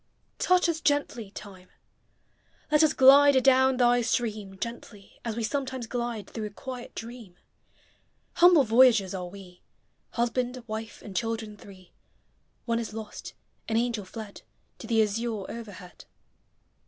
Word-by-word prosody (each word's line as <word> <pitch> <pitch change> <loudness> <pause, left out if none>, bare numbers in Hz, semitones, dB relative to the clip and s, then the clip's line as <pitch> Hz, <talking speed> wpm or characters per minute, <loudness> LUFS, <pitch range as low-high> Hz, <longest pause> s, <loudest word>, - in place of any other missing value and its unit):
Touch 365 -1 +3
us 325 -1 -2
gently, 285 -7 0
Time! 190 -2 -12 1.0
Let 300 0 +5
us 310 -1 +4
glide 280 0 +7
adown 260 0 +4
thy 245 -1 +4
stream 215 -4 -2
Gently, 225 -2 -8
— - - -42
as 230 -2 -3
we 230 - -3
sometimes 260 +1 -3
glide 235 -3 -4
Through 220 -2 -5
a - - -8
quiet 250 +4 -9
dream. 230 -5 -9 1.0
Humble 345 -4 +7
voyagers 225 -5 +4
are 180 -2 -5
We, 180 -1 -13 0.5
Husband, 245 +1 -2
wife, 220 0 -7
and 200 -3 -10
children 225 -2 -3
three 190 -3 -15 0.4
— - - -43
(One 230 -1 0
is 220 -2 -6
lost, 220 -1 -8
— - - -17
an 220 - +1
angel, 235 -3 -1
fled 210 +1 -9 0.4
To - - -9
the 225 -2 +3
azure 215 -1 -3
overhead.) 205 -6 -10
230 Hz, 145 wpm, -27 LUFS, 210-255 Hz, 1.0 s, glide